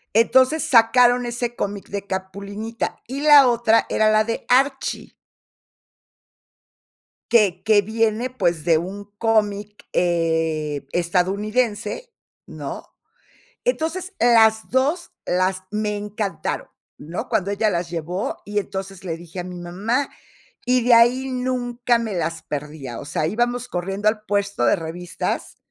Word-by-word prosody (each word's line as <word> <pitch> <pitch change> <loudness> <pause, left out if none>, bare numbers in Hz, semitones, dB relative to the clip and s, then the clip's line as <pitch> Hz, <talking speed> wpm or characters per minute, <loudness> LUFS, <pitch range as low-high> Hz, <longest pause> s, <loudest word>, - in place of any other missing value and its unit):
Entonces, 260 +7 +4
sacaron 245 -2 +5
ese 240 0 -3
cómic 205 -3 -4
de 200 0 -4
Capulinita, 200 +4 -4
y 265 +4 -5
la 290 -2 +8
otra 235 -2 +3
era 215 0 +3
la 215 0 +4
de 230 0 -3
Archie 270 +2 +1 2.2
que 200 -6 +3
que 215 -2 +5
viene, 225 +3 0
pues, 175 -11 -1
de 165 -1 +4
un 190 +5 -6
cómic, 210 -2 0
eh, 160 -4 0
estadounidense, 210 - -1 0.4
¿no? - - -6 0.8
Entonces, 370 -4 -1
las 220 -2 +4
2 285 +8 0
las 185 +1 0
me 210 0 -2
encantaron, 205 -3 -4 0.3
¿no? 165 +4 -6
Cuando 200 -3 0
ella 210 +1 +1
las 170 -2 -2
llevó, 175 +3 -3
y 205 0 -1
entonces 195 -1 -6
le 165 -3 -4
dije 175 +2 -8
a - - -7
mi 180 0 -8
mamá, 205 +10 -1 0.6
y 250 -1 +2
de 245 - +6
ahí 245 +3 +5
nunca 245 -1 0
me 225 -3 -3
las 165 -1 -2
perdía. 145 -4 -6
O - - -7
sea, 155 +1 -1
íbamos 240 +5 -1
corriendo 195 +1 -2
al 215 0 +2
puesto 200 -9 0
de - - +4
revistas, 170 +2 -4
210 Hz, 130 wpm, -22 LUFS, 180-240 Hz, 2.2 s, la